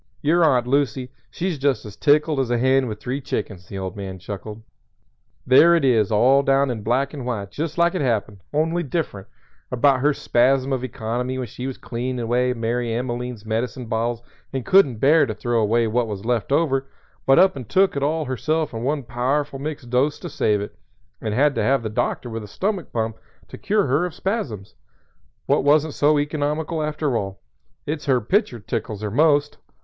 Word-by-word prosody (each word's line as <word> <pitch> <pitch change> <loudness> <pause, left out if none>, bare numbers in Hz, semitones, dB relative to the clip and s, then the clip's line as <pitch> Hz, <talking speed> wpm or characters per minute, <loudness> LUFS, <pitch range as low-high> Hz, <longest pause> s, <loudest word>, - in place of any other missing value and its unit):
Your 165 +4 +3
Aunt 125 -6 +3
Lucy, 130 -1 0 0.2
she's 170 +5 -3
just 135 -6 0
as 105 - -9
tickled 150 0 +3
as 130 -3 0
a 120 - +1
hen 130 +1 +3
with 105 -2 -5
three 130 +5 -4
chickens." 95 -7 -4
The 100 - -7
old 95 -2 -5
man 95 -2 -6
chuckled. 105 +3 -8 0.8
"There 165 +7 +7
it 165 - +2
is 115 -5 +3
all 130 +6 +5
down 135 -1 +2
in 110 -3 -4
black 130 +6 0
and 140 -4 -6
white 110 -5 -4
just 160 +1 -4
like 170 0 +3
it 185 - -1
happened, 105 -6 -1
only 160 +3 +1
different, 140 - -3 0.4
about 130 +2 +3
her 145 +3 +3
spasm 135 0 +2
of 130 -1 -2
economy 125 +1 -3
when 130 - -3
she 125 +2 -6
was 135 - -5
cleanin' 125 +2 -4
away 120 +2 +1
Mary 120 0 -2
Emmeline's 120 -1 -4
medicine 120 +3 -2
bottles 115 +1 -2 0.3
and 130 -3 -4
couldn't 190 -10 +5
bear 145 +4 +4
to 110 - -4
throw 120 0 0
away 115 +2 +2
what 115 +2 0
was 105 -1 -6
left 120 +1 -1
over, 135 -3 +1 0.4
but 135 - +6
up 190 -2 +5
and 125 -6 -8
took 190 -2 +3
it 140 - -1
all 155 +2 0
herself 155 +4 -1
in 115 - -4
one 140 +3 -1
powerful 135 +4 -1
mixed 140 -4 -6
dose 135 +4 +2
to 175 - -7
save 105 -7 +1
it, 100 - -7 0.5
and 110 -1 -2
had 145 +3 +3
to - - -1
have 135 -2 +2
the 110 - -2
doctor 110 +3 -2
with 115 -2 -5
a - - -9
stomach 195 - -3
pump 110 -1 -2 0.3
to - - -10
cure 205 0 +1
her 140 +6 +1
of 175 - -10
spasms, 135 - -3 0.7
what - - +2
wasn't 150 +1 +3
so 150 +1 +3
economical 150 +2 -1
after 150 -3 -1
all. 95 -3 -3 0.5
It's 150 0 -4
her 130 -2 +4
picture 155 - 0
tickles 110 0 -4
her 105 - -2
most." 145 +2 +2
130 Hz, 195 wpm, -22 LUFS, 115-145 Hz, 0.8 s, There